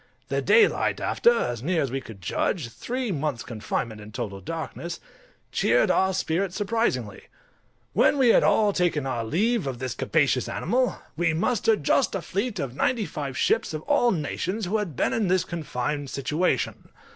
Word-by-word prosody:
The -, -, 0 dB
daylight, 445 Hz, -3 st, +3 dB
after, 475 Hz, -, +3 dB
as 120 Hz, -, -1 dB
near 165 Hz, +3 st, +1 dB
as 135 Hz, -, -3 dB
we 135 Hz, +1 st, -2 dB
could 110 Hz, -6 st, -11 dB
judge, 145 Hz, -, -1 dB
three 245 Hz, -, -3 dB
months' 145 Hz, -7 st, -2 dB
confinement 110 Hz, -1 st, -4 dB
in 105 Hz, +1 st, -11 dB
total 105 Hz, -4 st, -5 dB
darkness, 165 Hz, -, -5 dB, 0.5 s
cheered -, -, +3 dB
our 190 Hz, 0 st, +3 dB
spirits 185 Hz, +1 st, -1 dB
surprisingly. 225 Hz, +3 st, -1 dB, 0.7 s
When -, -, +4 dB
we 260 Hz, -3 st, +4 dB
had -, -, +6 dB
all 210 Hz, -2 st, +3 dB
taken 165 Hz, -6 st, +1 dB
our 120 Hz, -3 st, -2 dB
leave 200 Hz, -, +1 dB
of 130 Hz, -2 st, -3 dB
this 130 Hz, 0 st, -3 dB
capacious 140 Hz, -5 st, +1 dB
animal, 250 Hz, +8 st, 0 dB, 0.2 s
we 165 Hz, -1 st, +1 dB
mustered 220 Hz, +1 st, +1 dB
just 225 Hz, -, +2 dB
a 190 Hz, -, -2 dB
fleet 205 Hz, +3 st, -2 dB
of 135 Hz, -6 st, -4 dB
ninety 230 Hz, -, +1 dB
five 140 Hz, -7 st, -5 dB
ships, 155 Hz, -, +1 dB
of 155 Hz, -, -5 dB
all 285 Hz, -4 st, +3 dB
nations, 185 Hz, +3 st, -2 dB
who 200 Hz, +5 st, 0 dB
had 185 Hz, -9 st, -4 dB
been -, -, +1 dB
in 220 Hz, -3 st, +1 dB
this 185 Hz, 0 st, +2 dB
confined 145 Hz, -3 st, -3 dB
situation. 150 Hz, +7 st, -1 dB
165 Hz, 170 wpm, -25 LUFS, 135-210 Hz, 0.7 s, had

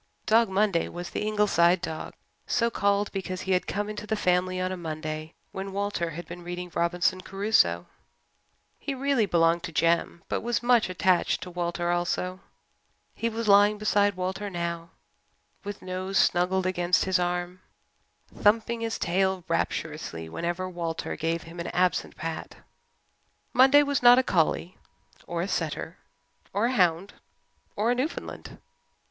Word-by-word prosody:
Dog 225 Hz, 0 st, +4 dB
Monday 195 Hz, -3 st, +1 dB
was 175 Hz, 0 st, -7 dB
the -, -, -3 dB
Ingleside 190 Hz, -4 st, +3 dB
dog, 160 Hz, -3 st, -6 dB, 0.3 s
so 235 Hz, -1 st, +1 dB
called 200 Hz, -1 st, +1 dB
because 185 Hz, -1 st, -4 dB
he 190 Hz, -, -3 dB
had 180 Hz, -1 st, +1 dB
come 205 Hz, +1 st, -2 dB
into 210 Hz, 0 st, -6 dB
the 220 Hz, -, 0 dB
family 185 Hz, -2 st, +1 dB
on 185 Hz, 0 st, -1 dB
a -, -, -2 dB
Monday 155 Hz, -2 st, -5 dB, 0.2 s
when 195 Hz, 0 st, -6 dB
Walter 200 Hz, -4 st, -1 dB
had 170 Hz, +2 st, -8 dB
been 175 Hz, +1 st, -8 dB
reading 175 Hz, 0 st, -6 dB
Robinson 175 Hz, +2 st, +1 dB
Crusoe. 190 Hz, -, +1 dB, 0.9 s
He 280 Hz, -, -4 dB
really 265 Hz, -5 st, +1 dB
belonged 170 Hz, -1 st, +3 dB
to 170 Hz, -, -6 dB
Jem 170 Hz, +1 st, +1 dB
but -, -, -2 dB
was 240 Hz, +1 st, -1 dB
much 240 Hz, -4 st, +4 dB
attached 185 Hz, 0 st, +1 dB
to 180 Hz, -, -7 dB
Walter 175 Hz, 0 st, -2 dB
also. 180 Hz, +1 st, -1 dB, 0.7 s
He 230 Hz, -, -1 dB
was 230 Hz, 0 st, -4 dB
lying 205 Hz, +1 st, +6 dB
beside 205 Hz, -1 st, +2 dB
Walter 190 Hz, +3 st, -3 dB
now 170 Hz, -2 st, -4 dB, 0.7 s
with 205 Hz, -1 st, -7 dB
nose 185 Hz, +1 st, -3 dB
snuggled 185 Hz, +1 st, +2 dB
against 180 Hz, -1 st, +2 dB
his 190 Hz, -1 st, +2 dB
arm, 175 Hz, +1 st, -2 dB, 0.7 s
thumping 230 Hz, +2 st, +2 dB
his 225 Hz, 0 st, -2 dB
tail 190 Hz, +1 st, 0 dB
rapturously 155 Hz, -, -3 dB
whenever 175 Hz, -, -3 dB
Walter 170 Hz, -2 st, -4 dB
gave 165 Hz, +1 st, -2 dB
him 165 Hz, +1 st, -11 dB
an 170 Hz, -, -4 dB
absent 180 Hz, -1 st, 0 dB
pat. 165 Hz, 0 st, -5 dB, 1.0 s
Monday 270 Hz, +3 st, +7 dB
was 285 Hz, -2 st, 0 dB
not 245 Hz, 0 st, +8 dB
a 260 Hz, -, +4 dB
collie 175 Hz, -2 st, 0 dB, 0.5 s
or 170 Hz, 0 st, -2 dB
a -, -, -3 dB
setter -, -, -3 dB, 0.5 s
or 205 Hz, +3 st, +1 dB
a 245 Hz, -, +1 dB
hound 180 Hz, -2 st, +2 dB, 0.6 s
or 220 Hz, +4 st, +1 dB
a -, -, +4 dB
Newfoundland. 260 Hz, +6 st, -4 dB
185 Hz, 155 wpm, -27 LUFS, 170-205 Hz, 1.0 s, not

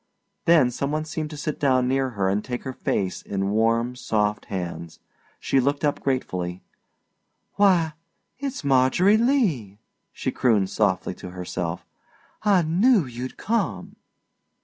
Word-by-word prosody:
Then 155 Hz, -7 st, +5 dB
some 140 Hz, +3 st, -2 dB
one 155 Hz, +1 st, -1 dB
seemed 155 Hz, -1 st, -4 dB
to 150 Hz, -, -8 dB
sit 150 Hz, 0 st, -4 dB
down 130 Hz, -3 st, +3 dB
near 135 Hz, 0 st, +1 dB
her 95 Hz, -1 st, +1 dB
and 100 Hz, +2 st, 0 dB
take 125 Hz, -1 st, -5 dB
her 130 Hz, -, -5 dB
face 95 Hz, -6 st, -2 dB
in 100 Hz, 0 st, -2 dB
warm, 115 Hz, +3 st, +1 dB
soft 105 Hz, -4 st, -1 dB
hands. 85 Hz, -4 st, -5 dB, 0.4 s
She 135 Hz, -, +1 dB
looked 140 Hz, +3 st, +1 dB
up 145 Hz, -, 0 dB
gratefully. 90 Hz, -9 st, -2 dB, 0.9 s
"Why 180 Hz, -6 st, +3 dB, 0.5 s
it's 275 Hz, -, -4 dB
Margery 140 Hz, +9 st, +4 dB
Lee," 200 Hz, -, +1 dB, 0.3 s
she -, -, -3 dB
crooned 105 Hz, -7 st, +2 dB
softly 95 Hz, -3 st, 0 dB
to 90 Hz, -, -9 dB
herself. 90 Hz, -1 st, -4 dB, 0.6 s
"I 200 Hz, -5 st, +4 dB
knew 190 Hz, -, +3 dB
you'd 125 Hz, +1 st, -7 dB
come." 190 Hz, -, -2 dB
130 Hz, 140 wpm, -24 LUFS, 100-155 Hz, 0.9 s, Then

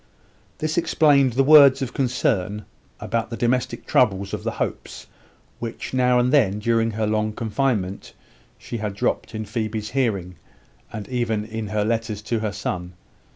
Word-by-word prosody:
This 155 Hz, +2 st, 0 dB
explained 140 Hz, -6 st, +3 dB
the 135 Hz, +3 st, +3 dB
words 140 Hz, -2 st, +7 dB
of 125 Hz, -1 st, -5 dB
concern 105 Hz, -6 st, -1 dB, 0.3 s
about 115 Hz, -1 st, -2 dB
the 115 Hz, -, -5 dB
domestic 125 Hz, +1 st, -1 dB
troubles 100 Hz, -5 st, +1 dB
of -, -, -4 dB
the -, -, -2 dB
Hopes, -, -, -5 dB, 0.5 s
which, 115 Hz, +1 st, -6 dB
now 125 Hz, -1 st, +3 dB
and 125 Hz, +2 st, +2 dB
then 105 Hz, -9 st, +3 dB
during 115 Hz, +1 st, +1 dB
her 110 Hz, 0 st, -2 dB
long 110 Hz, 0 st, 0 dB
confinement, 110 Hz, -4 st, -2 dB, 0.4 s
she 120 Hz, -, -6 dB
had 105 Hz, -2 st, -4 dB
dropped 110 Hz, -, -2 dB
in 110 Hz, 0 st, -4 dB
Phoebe's 110 Hz, 0 st, -3 dB
hearing, 100 Hz, -, -1 dB, 0.5 s
and 105 Hz, -3 st, -6 dB
even 115 Hz, -4 st, -1 dB
in 110 Hz, -1 st, -5 dB
her 105 Hz, 0 st, -1 dB
letters 110 Hz, -2 st, -2 dB
to 115 Hz, +1 st, -1 dB
her 110 Hz, -1 st, -2 dB
son. 90 Hz, -3 st, -4 dB
115 Hz, 155 wpm, -23 LUFS, 105-125 Hz, 0.5 s, words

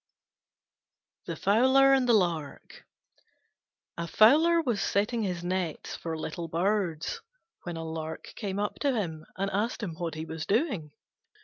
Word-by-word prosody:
THE -, -, -3 dB
FOWLER 260 Hz, +7 st, +5 dB
AND 260 Hz, -2 st, +3 dB
THE -, -, +6 dB
LARK 170 Hz, -7 st, -2 dB, 1.1 s
A 170 Hz, -, -2 dB
Fowler 310 Hz, -, +5 dB
was 240 Hz, -11 st, 0 dB
setting 215 Hz, +4 st, 0 dB
his 180 Hz, -4 st, -2 dB
nets 180 Hz, -2 st, -3 dB
for 165 Hz, -1 st, -4 dB
little 160 Hz, +2 st, -5 dB
birds 170 Hz, -1 st, -1 dB, 0.4 s
when 175 Hz, -2 st, -4 dB
a 165 Hz, -, -4 dB
Lark 160 Hz, 0 st, -6 dB
came 200 Hz, -3 st, -4 dB
up 205 Hz, 0 st, -2 dB
to 280 Hz, -3 st, +1 dB
him 160 Hz, -8 st, -3 dB
and 195 Hz, +1 st, -1 dB
asked 215 Hz, +4 st, -1 dB
him 180 Hz, -5 st, -3 dB
what 165 Hz, 0 st, -4 dB
he 155 Hz, +1 st, -5 dB
was 160 Hz, -1 st, -6 dB
doing. 200 Hz, -, 0 dB
190 Hz, 145 wpm, -28 LUFS, 165-225 Hz, 1.1 s, THE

